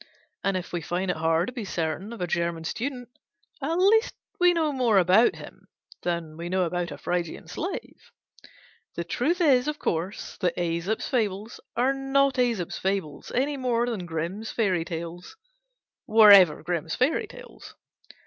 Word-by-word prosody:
And 195 -1 +1
if 180 - -7
we 175 - -2
find 180 +3 -1
it - - -4
hard 165 +1 +2
to 250 - -7
be 240 -3 -5
certain 175 +2 -3
of 235 - -8
a - - +1
German 170 -1 -2
student, 245 - -4 0.5
at 310 +5 -1
least 415 +6 +3 0.2
we 355 0 +6
know 325 -3 +1
more 245 -6 +2
about 190 +6 +5
him - - -12 0.3
than 170 -3 -3
We 170 +1 -5
know 185 0 +1
about 175 0 -2
a 145 - -7
Phrygian 175 +2 -3
slave. 360 - -6 0.9
The 170 - -2
truth 285 - -1
is, 275 -6 +4
of 300 0 -2
course, 180 - -3
that 180 -4 -1
Æsop's 175 +6 -1
Fables 215 -3 -2 0.2
are 255 +3 +2
not 270 0 +2
Æsop's 235 -8 0
fables, 190 -6 -3
any 280 +3 0
more 240 -2 +1
than 215 -8 -4
Grimm's 175 +7 -4
Fairy 190 -7 0
Tales 170 +1 -7 0.7
were 215 -1 +8
ever 180 -7 +7
Grimm's 165 -1 -2
fairy 265 +6 +1
tales. - - -13
195 Hz, 165 wpm, -26 LUFS, 170-250 Hz, 0.9 s, were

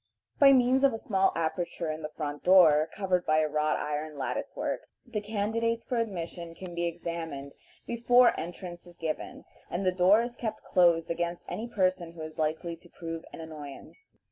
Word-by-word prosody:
By 280 -1 +9
means 260 +1 +4
of 275 -3 +5
a - - -2
small 195 -3 +2
aperture 165 0 -2
in 155 +1 -5
the 150 - -4
front 145 -2 -4
door, 160 -4 +6
covered 185 -3 +1
by 155 -1 +2
a 155 - +2
wrought 150 0 +1
iron 150 0 -3
lattice 130 -2 -3
work, - - -3 0.2
the 235 -4 -3
candidates 225 +2 -1
for 250 - -2
admission 170 -6 -4
can 180 0 -8
be 170 0 -1
examined 165 -4 -5 0.3
before 240 +1 +5
entrance 175 0 -7
is 175 - -15
given, 160 -1 -4 0.2
and 185 +3 -2
the 185 - +4
door 190 +5 +5
is 240 0 -5
kept 225 -3 -4
closed 170 -2 +3
against 170 +1 -2
any 230 - -4
person 185 -6 0
who 165 - -10
is 155 +1 -8
likely 160 +2 -1
to 175 +1 -18
prove 165 -1 -6
an - - -8
annoyance. 155 - -11
175 Hz, 185 wpm, -29 LUFS, 160-210 Hz, 0.3 s, By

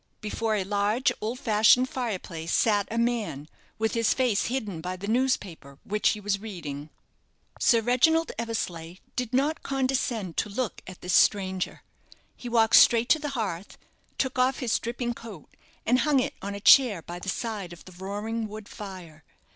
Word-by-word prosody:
Before 215 +1 -2
a 200 - 0
large, 205 +5 +1
old 225 +4 -3
fashioned 225 +3 +4
fire 240 -6 -2
place 165 -2 -7
sat 205 -3 +2
a 230 - -4
man, 230 - -1 0.3
with 220 0 0
his 230 -2 +2
face 250 -6 +1
hidden 215 -10 -3
by 180 +2 -4
the 195 +2 -7
newspaper 205 - -1
which 210 +1 +1
he 210 - -1
was 200 -1 -1
reading. 160 -9 -7 0.7
Sir 230 -2 +4
Reginald 285 +8 +3
Eversleigh 180 -8 -4 0.2
did 250 -2 -2
not 280 +5 +1
condescend 255 -8 -1
to 210 - 0
look 225 +1 -3
at 185 0 -10
this 180 - -2
stranger. 190 -3 +2 0.5
He 245 - -8
walked 225 -2 +5
straight 235 +1 +6
to 315 - +5
the 295 -1 -3
hearth; 195 -4 -4 0.4
took 260 -1 -1
off 255 +1 +3
his 245 -4 0
dripping 240 +1 -3
coat, 225 -9 -12 0.3
and 250 +2 +3
hung 295 -2 +3
it 255 - -1
on 200 +1 -5
a - - -5
chair 210 -5 +6
by 175 +1 -7
the 190 - -5
side 205 -4 -4
of 175 - -12
the 185 - -12
roaring 205 +5 -4
wood 215 0 -9
fire. 180 -7 -10
215 Hz, 175 wpm, -27 LUFS, 190-245 Hz, 0.7 s, straight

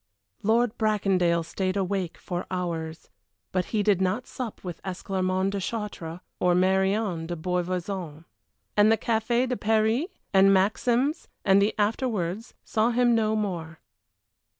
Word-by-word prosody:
Lord 230 +2 +2
Bracondale 190 -6 +2
stayed 185 +2 -2
awake 190 -3 -1
for 175 -1 -5
hours, 165 -3 -4 0.4
but 185 -1 0
he 215 -2 0
did 200 -3 +3
not 190 +7 0
sup 245 -4 -6
with 175 -3 -6
Esclarmonde 185 0 -1
de 200 - -2
Chartres 185 -5 -5 0.2
or 180 -1 +3
Marion 190 -1 +1
de 175 - -3
Beauvoison. 180 -1 -3 0.5
And 210 +1 +5
the 225 - +4
Café 235 +3 +1
de 250 - -1
Paris 220 +6 +2 0.3
and 195 0 +6
Maxims 240 - +2 0.2
and 195 0 +5
the 205 +2 +1
afterwards 210 -2 -1
saw 220 +1 +1
him 240 0 +3
no 220 -1 +2
more. 170 -6 -3
195 Hz, 135 wpm, -26 LUFS, 180-220 Hz, 0.5 s, and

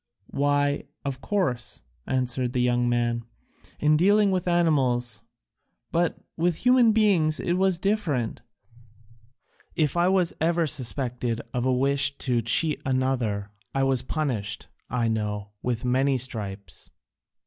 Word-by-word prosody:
"Why, 145 0 +1 0.2
of 135 -1 -4
course," 150 - -2 0.2
answered 125 -1 -1
the 125 - +1
young 120 0 +2
man, 120 -1 0 0.6
"in 150 0 +3
dealing 200 +4 +4
with 185 -1 -1
animals, 130 -10 +1 0.7
but 170 0 +1 0.2
with 170 0 +1
human 250 -2 +6
beings 190 -8 +3
it 175 - -1
was 190 0 +2
different; 175 - -1 1.3
if 150 -2 +1
I 175 +1 +3
was 185 -2 +2
ever 170 +1 +2
suspected 125 -4 -2
of 125 0 -1
a 130 - +2
wish 140 +2 +3
to 125 -3 0
cheat 150 +7 +2
another, 125 -6 -1 0.2
I 135 - +2
was 135 -2 +2
punished, 115 -9 -3 0.2
I 120 -2 0
know, 105 -2 -2
with 120 -1 -2
many 130 +2 +2
stripes." 105 -5 -5
135 Hz, 125 wpm, -25 LUFS, 120-165 Hz, 1.3 s, human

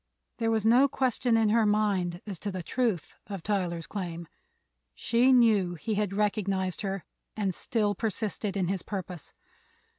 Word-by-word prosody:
There 225 - +1
was 220 -1 +1
no 245 +5 +6
question 250 -3 +1
in 220 -1 +3
her 225 +1 +4
mind 200 -4 +1
as 195 -6 -6
to 205 - -3
the 185 -2 -5
truth 225 -4 -1
of 195 -5 -6
Tyler's 180 -5 -1
claim; 170 -4 -5 0.7
she 235 - +3
knew 215 -8 +4
he 195 +7 -3
had 205 -2 0
recognized 195 -2 0
her 195 -2 -3 0.3
and 195 -3 0
still 210 +2 0
persisted 210 -1 -2
in 185 -3 0
his 190 0 -1
purpose. 185 -4 -6
205 Hz, 155 wpm, -28 LUFS, 185-220 Hz, 0.7 s, no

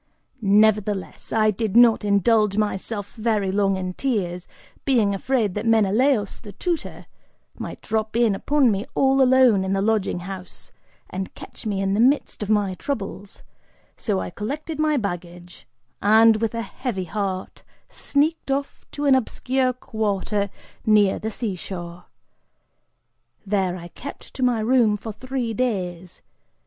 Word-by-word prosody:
Nevertheless, 210 -1 +2
I 215 -1 +3
did 215 +1 -1
not 235 -2 +6
indulge 205 0 +3
myself 205 0 -2
very 215 -4 0
long 195 -1 +1
in 185 -1 -4
tears, 180 -8 -2 0.4
being 230 -7 +2
afraid 215 -1 0
that 210 +3 -3
Menelaus, 220 +1 +2
the 205 -3 -11
tutor, 340 - -3 0.5
might - - -7
drop 220 0 -2
in 235 -3 +3
upon 275 +4 +2
me 200 +1 -2
all 270 0 +3
alone 255 -6 +5
in 190 0 -1
the 195 - +1
lodging 210 -4 0
house, 185 0 -9 0.4
and 190 +1 -5
catch - - -9
me 200 -2 -1
in 195 0 0
the 205 - 0
midst 260 +2 +2
of 210 - -3
my 205 -3 +2
troubles, 200 - -6 0.5
so 205 -4 -1
I - - -4
collected 290 - -5
my 305 -1 +2
baggage 175 -4 -6 0.3
and, 220 +2 +6
with 225 0 -2
a 230 - -2
heavy 205 -2 -4
heart, 190 0 -4 0.3
sneaked 300 +2 -1
off 275 +1 -3
to 290 - -3
an 275 - +5
obscure 260 +1 +1
quarter 210 -4 -2 0.3
near 210 -3 +4
the 220 - -3
seashore. 180 -5 -5 1.4
There, 190 -3 0
I 175 0 -9
kept 280 +10 -10
to - - -7
my 245 -3 +2
room 225 -2 +3
for 220 +1 -7
three 255 0 -3
days. 185 -7 -3
215 Hz, 145 wpm, -23 LUFS, 195-245 Hz, 1.4 s, not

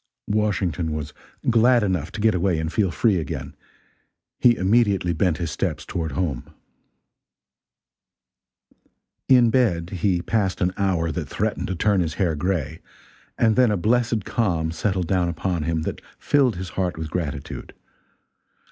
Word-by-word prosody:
Washington 95 -6 0
was 75 -1 -5 0.3
glad 120 0 +4
enough 90 -4 -1
to 105 - -5
get 110 0 +4
away 90 -1 +1
and 80 +1 -3
feel 100 -4 +2
free 100 +4 +2
again. 80 - -5 0.8
He 120 -1 +5
immediately 100 -3 +2
bent 85 0 +1
his 85 -3 -3
steps 80 -4 -3
toward 80 -5 -3
home. 70 -4 -3 2.7
In 125 -3 +6
bed 90 -9 +1
he 90 -1 0
passed 100 -3 0
an 90 -2 +1
hour 90 -5 0
that 75 -3 -4
threatened - - -2
to 95 - -3
turn 100 +3 +2
his 80 -2 -2
hair 90 -5 +1
gray, 85 -1 -2 0.6
and 110 -2 +3
then 125 -2 +4
a 105 - +1
blessed 115 +1 +1
calm 85 -9 0
settled 95 +1 -1
down 90 0 +1
upon 85 -1 -2
him 80 -1 -1
that - - -4 0.2
filled 135 -5 +2
his 90 +1 -5
heart 90 -1 -2
with 80 -1 -5
gratitude. 80 -6 -5
90 Hz, 145 wpm, -23 LUFS, 80-105 Hz, 2.7 s, In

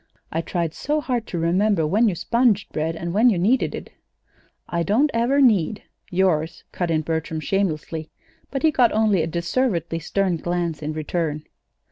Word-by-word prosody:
I 165 - -1
tried 170 -2 -2
so 300 - -1
hard 245 -6 -2
to 175 - -4
remember 175 +1 +2
when 215 +8 +3
you 185 - -2
sponged 230 +2 +1
bread 160 +1 -1
and 170 +1 -4
when 225 +5 +5
you 205 - +1
kneaded 220 +9 +1
it." - - -8 0.8
"I 170 - -1
don't 235 - +2
ever 240 +5 +2
need 210 - +3 0.3
yours," 175 -3 0
cut 175 -2 -2
in 160 -1 +1
Bertram, 160 0 -3
shamelessly; 160 -4 -2 0.4
but 270 +1 -4
he 315 - +5
got 250 -5 +3
only 215 -4 +3
a 160 - -1
deservedly 170 - -1
stern 185 +2 0
glance 170 -2 -2
in 155 +1 -3
return. 155 -1 -2
175 Hz, 170 wpm, -23 LUFS, 165-220 Hz, 0.8 s, when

